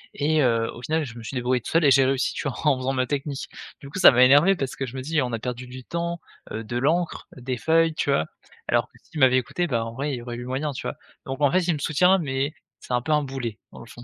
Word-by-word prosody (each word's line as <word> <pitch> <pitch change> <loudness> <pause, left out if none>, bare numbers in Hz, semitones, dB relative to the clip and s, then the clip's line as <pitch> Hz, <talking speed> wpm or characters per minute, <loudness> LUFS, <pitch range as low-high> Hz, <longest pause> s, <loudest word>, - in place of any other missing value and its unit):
et 155 +1 +2
heu, 115 -2 +1
au 120 - -10
final, 160 -1 0
je 120 -2 -10
me 115 - -9
suis 135 - -7
débrouillé 125 0 0
tout - - -7
seul 165 -2 +3
et 140 - +6
j'ai 135 0 +6
réussi, 135 0 0
tu - - -3
vois? - - -7
En 145 -3 +4
faisant 130 +1 -2
ma 130 -1 0
technique. 140 -1 -3 0.3
Du 140 - -10
coup, 150 - -7
ça 180 - +9
m'a 125 +1 +5
énervé 145 +9 +6
parce 135 -6 -4
que 135 - -3
je 125 - -9
me - - -3
dis: 155 +1 0
«On 125 -2 -4
a 115 - -2
perdu 125 +1 -5
du 130 0 -9
temps, 170 0 -3 0.3
heu, 110 - -4
de 120 +2 -4
l'encre, 160 +7 0
des 125 0 -4
feuilles», 165 +2 +2
tu 145 - 0
vois? 80 - +2 0.4
Alors - - +1
que - - -42
s'il 155 - -8
m'avait 130 -1 +5
écouté, 175 +8 -1
bah, 115 -6 -1
en 115 - -7
vrai, 140 +2 -2
il - - -2
y 120 - -7
aurait 120 -1 -6
eu 120 - -7
moyen, 135 +4 -2
tu 130 - -7
vois? - - -4 0.3
Donc, 135 +2 -5
en 145 -2 +4
fait, 185 - +3
il 175 - +3
me 150 - -4
soutient 180 +7 +3
mais, 140 -1 -2 0.3
c'est 125 - -5
un 120 - +2
peu 155 - -2
un 150 0 +4
boulet, 125 -5 -5
dans - - -12
le - - -11
fond. 120 - -13
135 Hz, 305 wpm, -24 LUFS, 125-150 Hz, 0.4 s, ça